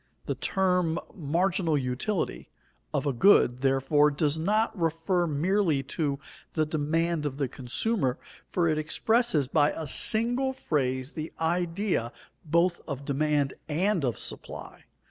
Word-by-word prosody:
The - - -1
term 180 -4 +1 0.2
"marginal 170 -1 0
utility" 135 +9 -2 0.4
of - - -1
a 140 - +1
good, 125 -4 +5
therefore, 135 +2 +3
does 150 +1 0
not 215 +7 +1
refer 170 +1 0
merely 160 -1 +1
to 145 -4 0 0.4
the 155 -1 +1
demand 155 +1 0
of 135 -1 -6
the 140 -2 0
consumer; 130 - -1 0.3
for 175 -2 +1
it 155 -1 +1
expresses 170 - +1
by 145 +1 +3
a 160 - -5
single 240 - +1
phrase 130 - -1
the 155 0 -5
idea 170 - 0 0.3
both 170 +3 +2
of 140 -2 -5
demand 145 -1 +1 0.2
and 180 +3 +1
of 125 -4 0
supply. - - -7
160 Hz, 130 wpm, -28 LUFS, 140-180 Hz, 0.4 s, good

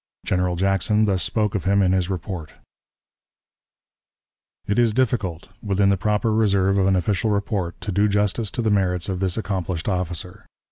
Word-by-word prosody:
General 90 -1 0
Jackson 95 +4 +2
thus 95 -3 +1
spoke 105 -2 0
of 100 - -3
him 100 +1 +3
in 90 - +2
his 95 -1 +1
report: 90 -4 -5 2.1
"It 100 +3 0
is 115 -3 +3
difficult, 105 -10 -1
within 100 -1 +1
the 100 - +3
proper 105 +3 0
reserve 100 -3 +2
of 95 - +2
an 95 - +3
official 95 +3 0
report, 100 -4 -2
to 105 - -4
do 100 +3 +2
justice 105 +1 0
to 120 - -2
the 110 - +1
merits 90 -2 +1
of 95 -1 -2
this 95 0 -1
accomplished 95 -6 -3
officer. 90 -2 -3
95 Hz, 170 wpm, -22 LUFS, 90-105 Hz, 2.1 s, him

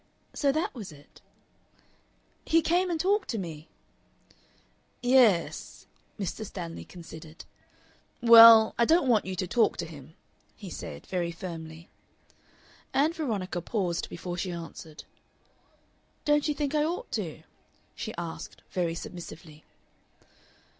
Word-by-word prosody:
So 280 -2 +2
that 310 +4 -1
was 210 -9 -8
it! 145 -1 -17 1.2
"He 330 0 +3
came 360 +2 +2
and 335 -2 -1
talked 395 +3 +1
to 230 - -2
me." 160 -5 -6 1.4
"Ye 245 +1 +1
e - - +8
es." 205 -9 +1 0.3
Mr. 200 +2 -3
Stanley 175 -5 -7
considered. 160 -2 -11 0.7
"Well, 230 -2 +9
I 235 - +5
don't 320 0 +3
want 225 -4 +3
you 190 0 -4
to 185 - -2
talk 225 +5 +2
to 170 - -3
him," 155 -1 -12 0.4
he 195 -5 -10
said, - - -8
very 175 -2 -2
firmly. 165 -2 -8 1.1
Ann 300 +4 +3
Veronica 205 - -3
paused 180 -2 -2
before 175 +1 -6
she 180 +2 -2
answered. 165 -2 -9 1.2
"Don't 295 0 +3
you 300 - 0
think 290 0 -2
I 300 -1 +2
ought 350 +10 -3
to?" - - -4 0.5
she 220 - -6
asked, 170 -1 -7
very 170 -2 -1
submissively. 160 -3 -9
190 Hz, 130 wpm, -28 LUFS, 170-270 Hz, 1.4 s, Well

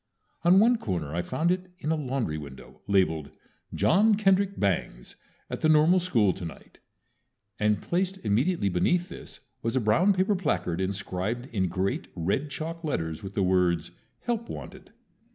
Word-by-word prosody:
On 180 +3 +6
one 230 +2 +4
corner 85 -7 -3
I 85 - 0
found 155 - 0
it 185 0 -2
in 160 -4 -2
a - - +2
laundry 130 - -2
window, 70 -3 -12
labeled, 85 -7 +1 0.4
"John 210 +5 +4
Kendrick 195 -1 +2
Bangs 90 -11 -2 0.3
at - - -6
the 155 - +3
Normal 155 +4 +5
School 115 - +2
Tonight," 85 -4 -10 0.8
and 105 -1 +1
placed 185 +2 -1
immediately 120 - +1
beneath 175 - +1
this - - -11 0.2
was 115 +2 -2
a - - +3
brown 115 - +3
paper 190 +2 +1
placard 90 - -1
inscribed 100 +4 -3
in 95 -4 +1
great, 95 +3 -2
red 95 - -1
chalk 165 +3 -5
letters 80 - -2
with 95 0 -8
the 100 - +1
words, 90 -3 +1 0.3
"HELP 235 -1 -2
WANTED." 190 0 -9
115 Hz, 155 wpm, -27 LUFS, -, 0.8 s, On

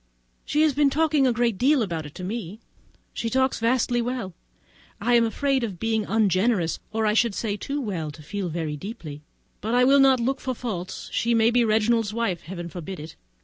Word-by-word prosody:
She 300 +2 +2
has 310 -2 +3
been 290 +1 +3
talking 300 -2 +2
a - - +3
great 235 -3 0
deal 275 0 +4
about 165 -6 -4
it 150 - -15
to 185 - -7
me. 205 0 -5 0.5
She 230 - -2
talks 260 +2 +1
vastly 240 +1 +1
well; 235 -6 -3 0.7
I 240 +4 +1
am 235 -1 +5
afraid 270 +3 0
of 195 -7 -4
being 220 -1 0
ungenerous, 200 -3 +1
or 220 0 0
I 210 - +3
should 225 -2 +2
say, 210 -3 -2
too 280 +7 -4
well 185 - -3
to 150 +1 -11
feel 200 +4 -4
so - - -5
very 160 -3 -2
deeply; 155 - -8 0.4
but 225 +4 -1
I 250 - +5
will 275 +2 +6
not 270 -2 +5
look 265 +3 0
for 255 -1 -3
her - - -20
faults; 190 -7 -5
she 235 0 +1
may 225 +1 +4
be 240 0 +3
Reginald's 220 -1 +2
wife! 215 -8 -1
Heaven 175 +1 -7
forbid 175 +2 -7
it! 155 +2 -9
225 Hz, 215 wpm, -25 LUFS, 185-245 Hz, 0.7 s, will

